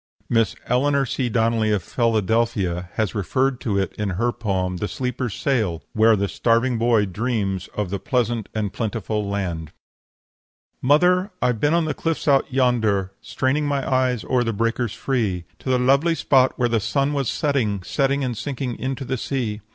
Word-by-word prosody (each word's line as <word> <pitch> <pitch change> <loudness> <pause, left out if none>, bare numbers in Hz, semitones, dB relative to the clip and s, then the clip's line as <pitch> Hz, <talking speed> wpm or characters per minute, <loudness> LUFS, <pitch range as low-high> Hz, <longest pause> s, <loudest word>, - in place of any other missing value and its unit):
Miss 115 -4 +2
Eleanor 140 +2 +2
C. 125 0 -2
Donnelly, 115 -1 +1
of 100 -4 0
Philadelphia, 110 -6 0
has 110 -3 0
referred 130 +6 0
to 105 -4 -1
it 95 -3 -1
in 105 -1 -1
her 120 +3 +1
poem, 95 -5 -2
"The 105 - -2
Sleeper's 125 -3 -3
Sail," 105 - 0
where 110 0 +5
the 100 0 0
starving 115 +3 +1
boy 115 -2 +3
dreams 100 -2 -2
of 105 -3 -2
the 100 - -2
pleasant 120 -2 -1
and 105 -3 -2
plentiful 110 -2 -2
land: 85 -6 -3 1.1
"'Mother, 180 +8 +4
I've 125 -3 +1
been 150 +6 +2
on 170 -1 +2
the 155 - -1
cliffs 165 -1 -2
out 140 -1 +3
yonder, 110 -7 +1
Straining 145 +3 0
my 140 -2 -1
eyes 130 -3 +1
o'er 125 -2 +2
the 115 -1 -1
breakers 115 +1 -1
free 110 -10 -1 0.2
To - - -6
the 130 - +3
lovely 140 +7 +3
spot 130 -4 +3
where 125 - +2
the 115 -1 +1
sun 140 +7 0
was 140 -4 0
setting, 115 - 0
Setting 140 +5 0
and 125 -2 -2
sinking 130 -1 -4
into 135 +1 -3
the 130 +1 -2
sea. 115 -4 -3
120 Hz, 175 wpm, -22 LUFS, 105-130 Hz, 1.1 s, where